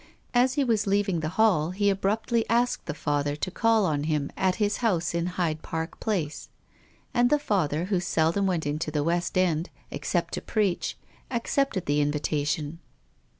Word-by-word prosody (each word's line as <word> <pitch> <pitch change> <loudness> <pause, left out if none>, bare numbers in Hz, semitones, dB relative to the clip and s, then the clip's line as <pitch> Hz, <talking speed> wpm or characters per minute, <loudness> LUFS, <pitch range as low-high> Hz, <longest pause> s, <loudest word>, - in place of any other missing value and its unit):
As 255 +2 +3
he 285 - +2
was 220 -5 +1
leaving 195 -3 +1
the 155 0 -2
hall 190 -8 +4
he 200 +2 +2
abruptly 220 +4 0
asked 240 +1 +1
the - - -3
Father 145 -1 -1
to 185 +5 -3
call 225 +1 +3
on 150 -4 0
him 150 -3 -1
at 185 -1 +1
his 205 -1 0
house 190 -10 0
in 170 0 0
Hyde 170 -4 -1
Park 160 +1 -4
Place. 175 -9 -2 0.6
And 245 0 +4
the 295 - +4
Father, 175 - 0
who 190 -1 +1
seldom 170 +3 +1
went 175 -5 0
into 150 +2 -2
the 150 -1 0
West 175 +3 0
End, 175 -2 +1 0.2
except - - -2
to - - -2
preach, 205 -5 -1 0.3
accepted 235 -3 0
the 145 +1 +2
invitation. 150 +1 -1
180 Hz, 170 wpm, -27 LUFS, 155-215 Hz, 0.6 s, hall